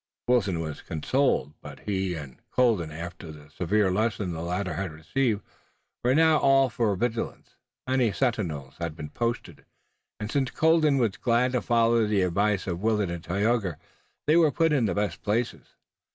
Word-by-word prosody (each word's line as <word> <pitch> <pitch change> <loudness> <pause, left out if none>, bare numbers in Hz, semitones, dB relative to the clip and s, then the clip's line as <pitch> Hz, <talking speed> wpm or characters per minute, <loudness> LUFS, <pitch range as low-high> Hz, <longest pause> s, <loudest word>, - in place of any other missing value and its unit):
Wilton 105 -8 +2
was 80 -2 -5
consoled. 80 - 0
But 75 -1 -10
both - - -20
he 95 -3 -1
and 70 -6 -9
Colden 115 -10 +2
after 85 +1 -7
the 75 -1 -14
severe 95 +3 +1
lesson 105 -1 0
the 80 - -5
latter 90 +1 -2
had 95 +2 -3
received 105 - -1 0.6
were 125 +2 +3
now 160 0 +5
all 135 -2 +4
for 110 -4 +1
vigilance. 115 +3 -3 0.3
Many 130 -4 +2
sentinels 90 - -2
had 85 -2 -4
been 75 - -8
posted, 115 - -3 0.6
and 105 +1 -4
since 135 -3 +1
Colden 160 0 +3
was 115 -6 +1
glad 125 +1 +2
to 125 -2 0
follow 115 -1 +3
the 105 -3 +2
advice 100 +2 +1
of 85 -1 -3
Willet 105 -4 +1
and 85 -1 -6
Tayoga 100 -2 0 0.5
they 155 - +4
were 165 -3 +5
put 165 0 +2
in 130 -6 +2
the 90 - -1
best 105 0 -2
places. 110 +4 -2
105 Hz, 170 wpm, -26 LUFS, 85-125 Hz, 0.6 s, now